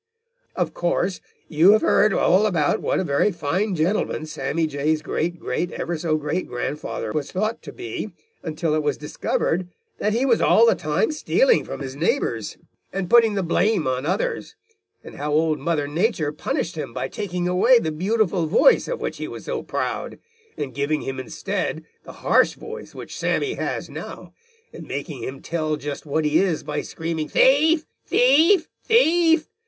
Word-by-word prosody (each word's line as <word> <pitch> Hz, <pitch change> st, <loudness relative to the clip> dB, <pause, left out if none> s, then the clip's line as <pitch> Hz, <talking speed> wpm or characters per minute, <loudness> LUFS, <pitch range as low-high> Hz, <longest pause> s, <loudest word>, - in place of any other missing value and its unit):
"Of -, -, -1 dB
course, 175 Hz, +2 st, -1 dB, 0.3 s
you 165 Hz, +6 st, +5 dB
have 215 Hz, -, +3 dB
heard 210 Hz, +1 st, +4 dB
all 195 Hz, +2 st, +3 dB
about 160 Hz, -7 st, +1 dB
what -, -, 0 dB
a -, -, 0 dB
very 145 Hz, +6 st, +2 dB
fine 185 Hz, +5 st, -1 dB
gentleman 165 Hz, -1 st, 0 dB
Sammy 155 Hz, +2 st, -2 dB
Jay's 155 Hz, +1 st, -1 dB
great 170 Hz, +2 st, -2 dB
great 170 Hz, +7 st, -2 dB
ever 175 Hz, -, -3 dB
so 155 Hz, -1 st, 0 dB
great 155 Hz, +4 st, -2 dB
grandfather 125 Hz, -2 st, -4 dB
was 145 Hz, +1 st, -3 dB
thought 215 Hz, +5 st, -2 dB
to -, -, -9 dB
be 370 Hz, 0 st, -6 dB, 0.3 s
until 160 Hz, 0 st, -2 dB
it 155 Hz, -, +1 dB
was 145 Hz, -2 st, -1 dB
discovered 165 Hz, +3 st, -1 dB, 0.3 s
that 210 Hz, +1 st, 0 dB
he 240 Hz, +4 st, +1 dB
was 240 Hz, -4 st, +3 dB
all 230 Hz, -, +5 dB
the 230 Hz, -, +5 dB
time 155 Hz, -, 0 dB
stealing 480 Hz, +10 st, +2 dB
from -, -, -7 dB
his 135 Hz, -1 st, -6 dB
neighbors 145 Hz, -, -1 dB, 0.3 s
and 190 Hz, -2 st, -4 dB
putting 230 Hz, -3 st, +6 dB
the 195 Hz, -, 0 dB
blame 185 Hz, +1 st, +1 dB
on 130 Hz, +2 st, -1 dB
others, 190 Hz, +5 st, -2 dB, 0.5 s
and -, -, -11 dB
how 150 Hz, +1 st, -3 dB
Old 155 Hz, 0 st, +2 dB
Mother 150 Hz, 0 st, -1 dB
Nature 165 Hz, -1 st, 0 dB
punished 215 Hz, -, -3 dB
him 135 Hz, -7 st, -6 dB
by 130 Hz, -, -2 dB
taking 180 Hz, 0 st, -3 dB
away 190 Hz, +8 st, +5 dB
the 160 Hz, -9 st, -1 dB
beautiful 185 Hz, 0 st, 0 dB
voice 215 Hz, -, +4 dB
of -, -, -4 dB
which -, -, -3 dB
he -, -, -5 dB
was -, -, -9 dB
so 475 Hz, -2 st, -3 dB
proud, -, -, -3 dB, 0.4 s
and 140 Hz, -3 st, -4 dB
giving 145 Hz, +3 st, -1 dB
him 135 Hz, 0 st, -5 dB
instead 165 Hz, +3 st, -3 dB, 0.2 s
the -, -, -9 dB
harsh -, -, +4 dB
voice 455 Hz, +1 st, -9 dB
which -, -, -8 dB
Sammy 405 Hz, -2 st, 0 dB
has -, -, -3 dB
now, -, -, -9 dB, 0.4 s
and -, -, -10 dB
making -, -, -5 dB
him 135 Hz, +1 st, -6 dB
tell 155 Hz, -2 st, -1 dB
just 145 Hz, +1 st, -6 dB
what 155 Hz, +2 st, 0 dB
he 150 Hz, +1 st, +3 dB
is 180 Hz, -5 st, 0 dB
by 150 Hz, 0 st, -3 dB
screaming 160 Hz, -2 st, -4 dB
'thief, 305 Hz, +4 st, +4 dB, 0.2 s
thief, 315 Hz, +9 st, +4 dB, 0.2 s
thief!' 335 Hz, -8 st, +4 dB
170 Hz, 175 wpm, -23 LUFS, 150-220 Hz, 0.5 s, putting